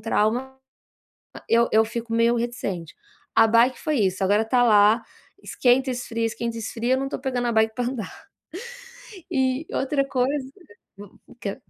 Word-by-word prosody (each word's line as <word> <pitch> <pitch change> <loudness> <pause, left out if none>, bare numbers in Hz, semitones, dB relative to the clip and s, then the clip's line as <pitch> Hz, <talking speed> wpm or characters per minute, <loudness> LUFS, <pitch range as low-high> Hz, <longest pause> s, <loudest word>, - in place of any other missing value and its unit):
trauma, 235 +4 -1 0.8
ah, - - -11
eu 235 +1 +4
eu 220 +1 +4
fico 230 0 -5
meio 230 +1 +3
reticente. 230 -9 -4 0.4
A 225 - +6
bike 235 +3 +3
foi 305 -6 -1
isso, 190 -1 0
agora 205 +3 +3
tá 245 +2 +2
lá, 215 0 +5 0.4
esquenta, 260 +1 +2
esfria, 230 -2 -3
esquenta, 230 +1 -3
esfria, 230 +3 -1
eu 260 - -2
não 270 0 -3
tô - - -4
pegando 250 -2 -2
a - - +1
bike 220 0 +2
pra 245 - -2
andar. 240 -6 -6 1.1
E 265 - +4 0.4
outra 275 +1 0
coisa 265 +1 0 0.5
hum 205 -1 -10 0.3
quer 200 -1 -3
235 Hz, 160 wpm, -24 LUFS, 220-250 Hz, 1.1 s, A